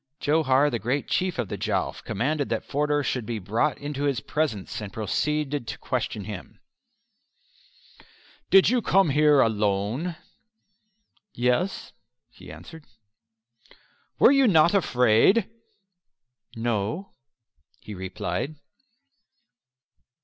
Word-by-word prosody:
Johar, 145 -2 +2
the 120 - -2
great 125 +7 -2
Chief 185 -2 -1
of 120 -4 -2
the - - -6
Jowf, - - -2
commanded 145 +7 -2
that - - -2
Forder 145 0 0
should 125 -3 -2
be 115 +1 -4
brought 110 +9 -1
into 145 0 -4
his 140 -4 0
presence, 115 -9 -3
and 105 -2 -7
proceeded 145 +6 -2
to - - -5
question - - -3
him: - - -9 1.9
"Did 195 -1 +6
you 250 -1 +2
come 195 -4 +3
over - - 0
here 150 -1 +5
alone?" 110 - 0 1.2
"Yes," 125 +10 -1 0.4
he - - -13
answered. 160 -2 -12 1.3
"Were - - +6
you 275 -2 +4
not 170 -3 +5
afraid?" 130 - +3 1.1
"No," 115 - -2 0.7
he 105 - -9
replied. 95 - -4
140 Hz, 110 wpm, -25 LUFS, 115-155 Hz, 1.9 s, Did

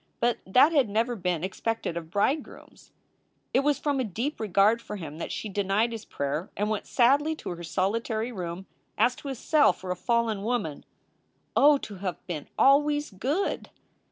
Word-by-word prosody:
But 240 0 +1
that 255 +11 +6
had 275 -8 +3
never 230 +4 0
been 180 -5 -1
expected 195 0 -2
of 165 -2 -5
bridegrooms. 235 - -2 0.6
It - - +5
was 285 +1 +2
from 285 -2 -1
a - - +1
deep 240 - -3
regard 215 +2 +3
for 210 - -7
him 160 -5 -7
that - - -4
she - - -4
denied 205 +3 +1
his 225 -2 -6
prayer 145 +6 -3
and 210 +1 0
went 215 - -3
sadly 285 +6 +3
to - - -6
her 175 0 -7
solitary 220 +6 -1
room 180 -3 -5 0.3
as 250 - +3
to - - -9
a 270 - -3
cell 300 +4 +4
for 185 -1 -7
a - - -1
fallen 230 +1 0
woman. 215 -9 -2 0.7
Oh, 290 0 +6
to 210 -7 -8
have 185 -1 -5
been 160 -5 -5
always 295 +1 +4
good! 275 - -2
220 Hz, 180 wpm, -27 LUFS, 185-260 Hz, 0.7 s, that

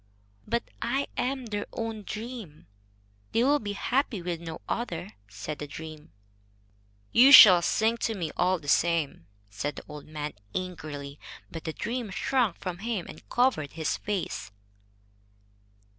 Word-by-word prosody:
"But 235 +2 0 0.2
I 270 +4 0
am 260 0 -1
their 205 -2 -3
own 225 -2 -3
dream. 215 - -7 0.7
They 230 - +3
will 290 +3 +4
be 205 -1 -4
happy 245 +1 0
with 170 -1 -4
no 165 -1 -6
other," 180 - -3 0.2
said 105 +9 -6
the 150 - -5
dream. 155 +1 -9 1.0
"You 260 +4 +7
shall 190 -10 +11
sing 220 +6 +2
to 225 -1 -1
me, 165 -5 -3
all 185 +1 +2
the 150 -4 -13
same," 155 - +1 0.2
said 140 +8 -3
the - - -8
old 150 -1 -9
man, 150 -1 -5 0.2
angrily. 155 -6 -5 0.3
But 165 0 -7
the 160 - -3
dream 240 +3 -3
shrank 230 0 +1
from 180 -2 -5
him 215 -4 -2
and - - -12
covered 240 - +1
its 160 -2 0
face. 185 - -3
180 Hz, 145 wpm, -28 LUFS, 155-230 Hz, 1.0 s, shall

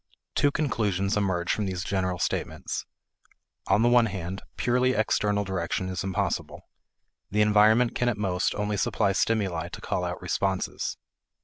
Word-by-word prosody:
Two 145 - +3
conclusions 105 - 0
emerge 95 -4 0
from 105 -2 -1
these 90 -1 -3
general 95 -2 -1
statements. - - -3 0.8
On 110 - +3
the - - +5
one 120 -1 +5
hand, 95 -1 -5 0.2
purely 125 +1 +2
external 105 -2 +1
direction 95 -1 -2
is 90 -2 -3
impossible. 95 -1 -2 0.7
The 105 +2 +1
environment 110 +3 +5
can 125 - +1
at 115 - -2
most 95 -3 0
only 105 0 -1
supply 100 +1 +1
stimuli 95 -5 0
to - - -8
call - - -2
out - - -3
responses. 95 -1 -2
100 Hz, 145 wpm, -27 LUFS, 95-110 Hz, 0.8 s, the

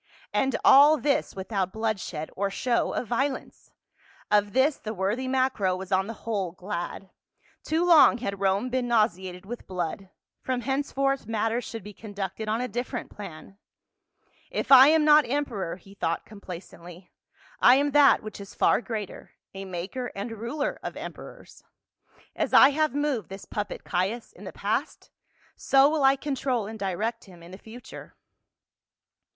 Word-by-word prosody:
And 270 -1 +1
all 290 +3 +8
this 285 -1 0
without 190 -1 -2
bloodshed 205 -8 -3
or 200 +1 -1
show 235 +4 0
of - - -2
violence. 265 +4 -3 0.6
Of 205 -1 +2
this 275 +3 +3
the 215 0 -6
worthy 205 +8 -1
Macro 255 -8 +1
was 190 +1 -8
on 190 +1 +2
the 225 - -9
whole 200 -6 -2
glad; 185 0 -6 0.5
too 325 +3 0
long 325 -7 +7
had 200 -5 -4
Rome 200 +5 +1
been 255 -1 -1
nau 230 -3 +5
seated 185 -2 -9
with 240 +4 -8
blood, 185 +1 -4 0.3
from 255 -1 -2
henceforth 275 0 -1
matters 225 +2 -1
should 225 -4 -7
be 210 +1 -10
conducted 205 0 -6
on 225 +3 0
a 250 - -2
different 245 +3 -5
plan. 195 0 -10 0.4
" - - -37
If - - -3
I 265 0 +10
am 310 0 +4
not 300 -3 +6
emperor," 240 -11 -2
he 195 +2 -17
thought 170 -4 -2
complacently, 180 -3 -11 0.2
" - - -28
I 245 - +7
am 285 +1 +1
that 290 -1 +5
which 215 -1 -8
is 200 - -11
far - - +3
greater, 220 -5 -6 0.2
a 195 0 -7
maker 190 +8 -5
and 200 +4 -5
ruler 235 +7 -3
of - - -6
emperors. - - -10 0.7
As - - 0
I 270 - +9
have 305 -1 0
moved 285 - -1
this 195 +1 -9
puppet, 210 -1 -5
Caius, 195 +6 -2
in - - -13
the - - -6
past - - -3 0.4
so 270 0 +4
will 300 -1 0
I 270 0 +6
control 270 -5 -2
and 220 +1 -8
direct 210 +5 -3
him 175 -4 -15
in 170 - -13
the 190 - -9
future." 230 +4 -12
220 Hz, 165 wpm, -26 LUFS, 195-265 Hz, 0.7 s, I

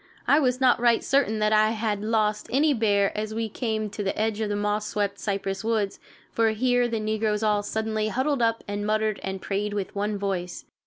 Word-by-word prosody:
I 290 - +5
was 255 -3 +1
not 255 -2 +4
right 235 -1 +3
certain 270 -6 +2
that 215 0 +2
I 215 0 +5
had 210 -2 -1
lost 215 -1 0
any 290 +4 +3
bear 205 -4 +2
as 215 +1 -3
we 225 0 -1
came 220 -1 -2
to 205 - -5
the 195 0 -2
edge 220 0 0
of 215 - -1
the 205 - -1
moss 210 +1 -1
swept 200 -1 -2
cypress 195 -1 -3
woods, 215 -3 -1 0.3
for 225 -1 +2
here 245 +2 +2
the 230 -2 -2
negroes 215 0 -1
all 210 -1 +2
suddenly 220 +1 -2
huddled 260 +4 0
up 230 -1 +1
and 205 0 -3
muttered 215 0 0
and 190 0 -4
prayed 205 +1 -2
with 200 -2 -3
one 205 +1 -1
voice. 190 -3 -3
215 Hz, 210 wpm, -25 LUFS, 205-225 Hz, 0.3 s, I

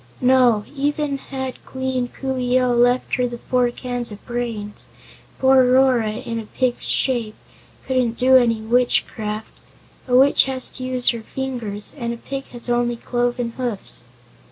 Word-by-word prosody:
"No; 250 -4 +4
even 290 0 -1
had 265 -1 -6
Queen 260 -1 -2
Coo 265 +1 -4
ee 250 0 +2
oh 250 -1 +2
left 245 +1 +2
her 250 0 +1
the 240 0 -6
four 250 0 +1
cans 245 -1 -4
of 205 - -11
brains, 230 -4 -4 0.5
poor 265 0 +5
Rora, 255 -4 +3
in 230 +1 -4
a 220 - -8
pig's 255 +1 -1
shape, 235 -5 0 0.5
couldn't 250 -3 0
do 260 +1 +5
any 230 -3 +4
witchcraft. 220 -2 0 0.6
A 250 - +2
witch 270 +3 +6
has 260 -1 +1
to 255 - -7
use 255 -1 +1
her 235 -2 -1
fingers, 225 -4 -4
and 235 -4 -3
a - - -11
pig 270 +3 -6
has 240 0 -8
only 240 0 +1
cloven 240 0 -1
hoofs." 230 - -4
245 Hz, 155 wpm, -21 LUFS, 235-260 Hz, 0.6 s, witch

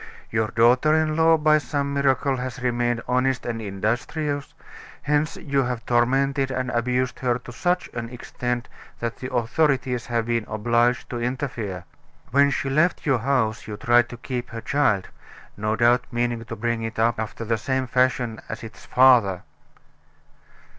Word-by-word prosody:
Your 110 -1 +1
daughter 125 +8 +4
in 155 -1 +1
law, 165 0 +5
by 155 0 +4
some 140 -1 -2
miracle, 140 -1 +1
has 125 0 -5
remained 120 -1 0
honest 125 +1 +1
and 115 -1 -3
industrious, 120 - -2 0.5
hence 150 +1 0
you 140 -2 0
have 125 -2 -3
tormented 135 +3 +2
and 130 -1 -2
abused 125 +1 0
her 125 -2 +1
to 125 0 -11
such 180 +9 0
an 115 -1 -5
extent 125 0 -4 0.3
that 115 -1 -3
the 130 +1 -6
authorities 125 0 0
have 115 -2 0
been 115 -2 -1
obliged 120 +3 +1
to 120 -1 -3
interfere. 120 -7 -3 0.5
When 140 +2 +5
she 140 - -2
left 155 +6 +1
your 135 -5 +2
house 115 -3 0
you 105 -1 -6
tried 120 +2 +3
to 120 - -8
keep 125 0 -5
her 115 -1 -6
child 110 -10 +1 0.5
no 110 +1 -1
doubt 120 +2 +3
meaning 120 -1 -1
to - - -6
bring 115 +1 -1
it 115 0 -5
up 115 0 +2
after 110 +1 -4
the 115 0 0
same 130 +3 -1
fashion 125 -2 0
as 110 +2 -6
its 110 - -10
father." 120 -8 +4
125 Hz, 160 wpm, -24 LUFS, 115-135 Hz, 0.5 s, law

